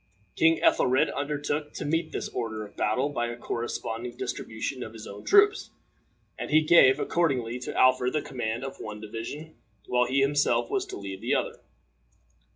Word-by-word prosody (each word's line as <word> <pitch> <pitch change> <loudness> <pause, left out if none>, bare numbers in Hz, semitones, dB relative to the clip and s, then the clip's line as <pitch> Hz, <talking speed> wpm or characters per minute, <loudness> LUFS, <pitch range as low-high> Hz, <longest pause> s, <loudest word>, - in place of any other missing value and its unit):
King 165 0 +4
Ethelred 130 +2 +3
undertook 145 +1 -3
to - - -5
meet 165 +2 -1
this - - -3
order 110 -3 -4
of 100 - -15
battle 125 +7 0
by 120 -4 -2
a 120 - -5
corresponding 120 0 -4
distribution 115 +4 -4
of 110 - -7
his 110 -1 -9
own 100 +1 -9
troops, 410 +1 +4 0.7
and - - -4
he 155 +1 +5
gave, 150 -4 +6
accordingly, 130 -10 0
to 125 - -6
Alfred 130 -1 +4
the 155 - 0
command 120 -2 -3
of 135 - -7
one 105 0 -7
division, 115 +9 -7 0.3
while 125 0 +2
he 135 +1 +2
himself 145 - +2
was 395 -2 -1
to - - -7
lead 95 -1 -7
the - - +1
other. - - -2
130 Hz, 170 wpm, -27 LUFS, 115-150 Hz, 0.7 s, gave